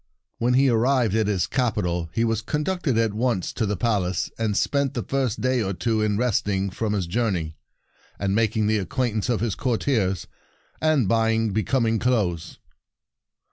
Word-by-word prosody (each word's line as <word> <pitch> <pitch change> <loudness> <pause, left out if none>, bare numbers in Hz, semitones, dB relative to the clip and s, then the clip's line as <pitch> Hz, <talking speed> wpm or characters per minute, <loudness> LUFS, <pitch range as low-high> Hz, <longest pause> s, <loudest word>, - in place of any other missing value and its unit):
When 125 +2 +2
he 135 +1 +4
arrived 120 -2 +2
at 110 -1 +2
his 95 -5 +1
capi 125 -8 0
tal 85 -1 -2
he 115 - 0
was 115 -1 0
conducted 150 +1 -1
at 115 -2 +1
once 115 -4 -1
to 110 - -1
the 105 -1 -1
palace, 95 -5 0
and 110 -3 -1
spent 140 -2 0
the 120 - -2
first 130 -4 -1
day 130 -1 +1
or 100 -2 -1
two 110 +5 0
in 105 -1 +1
resting 100 -5 0
from 105 +3 -2
his 100 -4 -1
journey, 85 -5 -1 0.6
and 100 -1 -1
malting 110 0 +1
the 110 0 +2
acquaintance 120 +1 -1
of 120 -3 0
his 115 -3 0
courtiers, 110 -6 0 0.6
and 155 -8 +2
buying 115 0 +2
becoming 115 +2 +1
clothes. 95 -9 -1
110 Hz, 170 wpm, -24 LUFS, 100-125 Hz, 0.6 s, he